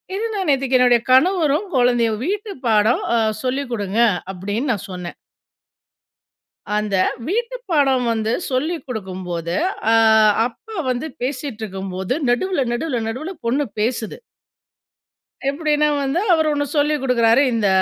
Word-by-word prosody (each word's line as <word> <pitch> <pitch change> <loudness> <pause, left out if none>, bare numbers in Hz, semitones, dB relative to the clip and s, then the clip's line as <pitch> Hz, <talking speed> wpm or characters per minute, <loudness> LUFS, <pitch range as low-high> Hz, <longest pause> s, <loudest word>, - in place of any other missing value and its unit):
இது 435 - -2
நான் 380 -4 -2
நேத்தைக்கு 265 -2 +2
என்னுடைய 245 -2 +4
கணவரும், 325 +4 +3
குழந்தையும் 240 -3 +2
"வீட்டு 410 +3 -3
பாடம் 220 +1 +3
அ - - +3 0.3
சொல்லிக் 260 0 -2
கொடுங்க" 205 0 -2 0.3
அப்டின்னு 205 +8 -2
நான் 200 - -6
சொன்னேன். 180 -1 -7 1.6
அந்த 210 -2 0 0.3
வீட்டு 470 +6 -1 0.2
பாடம் 270 -5 +3
வந்து 220 0 -1 0.2
சொல்லி 300 +7 0
குடுக்கும்போது, 185 -6 -4 0.4
அ - - +5 0.5
அப்பா 440 - -13
வந்து 255 +5 -2
பேசிட்டிருக்கும் 220 -8 -4
போது 190 +6 -2 0.2
நடுவுல, 320 +6 +1
நடுவுல, 245 +1 -1
நடுவுல 300 +11 -4
பொண்ணு 275 +5 +1
பேசுது. 225 0 -2 1.3
எப்டின்னா 300 0 +1 0.2
வந்து, 275 +6 0
அவரு 315 -2 +2
ஒண்ணு 290 0 0
சொல்லி 295 +1 +2
கொடுக்குறாரு. 240 -1 +3
இந்த 220 -3 +1
250 Hz, 125 wpm, -20 LUFS, 220-300 Hz, 1.6 s, அ